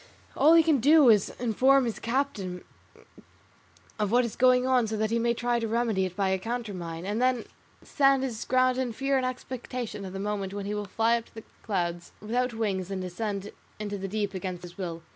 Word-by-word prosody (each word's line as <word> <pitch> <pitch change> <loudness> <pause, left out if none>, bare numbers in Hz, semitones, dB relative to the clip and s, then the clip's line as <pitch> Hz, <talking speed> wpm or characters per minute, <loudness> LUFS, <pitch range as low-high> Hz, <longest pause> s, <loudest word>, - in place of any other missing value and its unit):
All 315 +3 +6
he 330 - +7
can 310 -4 +3
do 290 +1 +6
is 210 -3 +5
to - - -10
inform 260 +4 +4
his 230 - -3
captain 230 -8 -2 1.4
of 210 -1 +1
what 245 +1 +4
is 235 - -5
going 255 0 +4
on 255 -3 +3
so 215 0 -3
that 215 +1 -1
he 230 - +1
may 235 0 +1
try 240 0 0
to 230 - -2
remedy 225 -4 0
it 180 -1 -6
by 195 -1 0
a 190 0 0
counter 230 +1 -4
mine, 170 -1 -6
and 210 +4 -2
then 255 -2 +1 0.4
stand 275 -2 +3
his 235 -4 -3
ground 255 0 +2
in 250 -3 -2
fear 275 +4 0
and 255 -1 0
expectation 250 -4 -5
of 190 -1 -7
the 195 - -5
moment 200 -1 -3
when 200 -1 -4
he 205 - -3
will 210 0 -3
fly 225 +4 +1
up 230 - -14
to - - -24
the 225 - -8 0.2
clouds 175 -4 -3
without 245 +4 -1
wings 200 -5 -2
and 190 -1 -3
descend 200 +2 -4 0.3
into 205 -1 -4
the 195 - -4
deep 205 0 -2
against 185 -2 -5
his 175 -1 -10
will. 170 -3 -5
225 Hz, 220 wpm, -27 LUFS, 195-250 Hz, 1.4 s, he